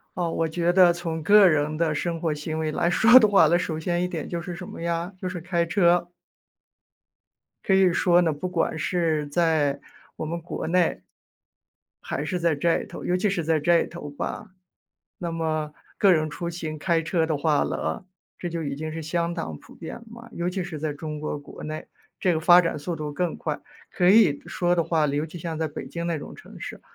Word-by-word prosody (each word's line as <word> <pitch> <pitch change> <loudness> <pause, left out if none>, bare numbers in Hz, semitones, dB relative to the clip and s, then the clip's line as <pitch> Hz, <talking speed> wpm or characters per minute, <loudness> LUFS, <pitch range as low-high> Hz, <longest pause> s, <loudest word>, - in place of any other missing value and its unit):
哦， 175 -2 -1
我 165 - 0
觉 170 +2 0
得 180 -1 +6
从 165 -2 -4
个 205 +3 +7
人 155 -2 +1
的 160 -1 +1
生 165 +1 -2
活 165 - 0
行 155 +1 -4
为 155 -1 -1
来 170 - 0
说 240 +8 +7
的 215 - +5
话 195 -6 +5
呢， 170 +3 +4
首 160 -3 -3
先 175 +2 -1
一 - - 0
点 170 -4 -5
就 170 - -3
是 175 0 -6
什 180 0 -8
么 - - -9
呀？ 170 +1 -2
就 185 - -4
是 180 -2 -5
开 170 0 0
车。 175 -1 +2 1.5
可 195 - +2
以 190 -2 +5
说 175 0 +4
呢， 165 -3 +1
不 150 +5 -4
管 165 -2 -1
是， 160 -3 0
在 145 -2 +1 0.4
我 - - -4
们 170 +2 -3
国 165 - -5
内， 175 0 +1 1.0
还 145 - -4
是 180 - -2
在 170 -1 +2
这 165 +4 +1
头， - - -9
尤 180 - +1
其 190 +3 +1
是 190 -3 -1
在 160 0 +2
这 170 +3 +3
头 170 -4 -8
吧。 185 +7 -6 0.7
那 170 -2 -4
么， 155 -2 -2 0.2
个 195 -2 +6
人 155 -2 +1
出 170 +3 -5
行 160 -2 -5
开 165 +1 +1
车 165 0 0
的 160 -2 0
话 150 0 +2
了， - - -3 0.3
这 175 - -4
就 165 -1 -4
已 140 -2 -3
经 155 +1 -5
是 165 +1 -5
相 170 +2 -1
当 165 - -5
普 - - -17
遍 165 - -8
了 235 - -13
嘛。 235 +1 -12
尤 170 +1 -2
其 185 +1 -2
是 175 -3 -6
在 155 0 -2
中 150 +1 -6
国 150 0 -3
国 145 - -11
内， 155 0 -6 0.3
这 180 - +2
个 160 - +1
发 175 +2 +7
展 165 -3 -2
速 160 +4 -4
度 150 -2 -5
更 175 +2 -2
快。 150 -2 -4 0.3
可 180 -1 +2
以 195 -8 +5
说 175 0 0
的 170 - +2
话， 160 -2 +1
尤 145 +2 -1
其 165 - -11
像 165 -1 -5
在 160 - 0
北 150 - -7
京 170 0 -4
那 170 -1 0
种 - - -9
城 - - -13
市， - - -7
170 Hz, 240 characters per minute, -25 LUFS, 155-175 Hz, 1.5 s, 个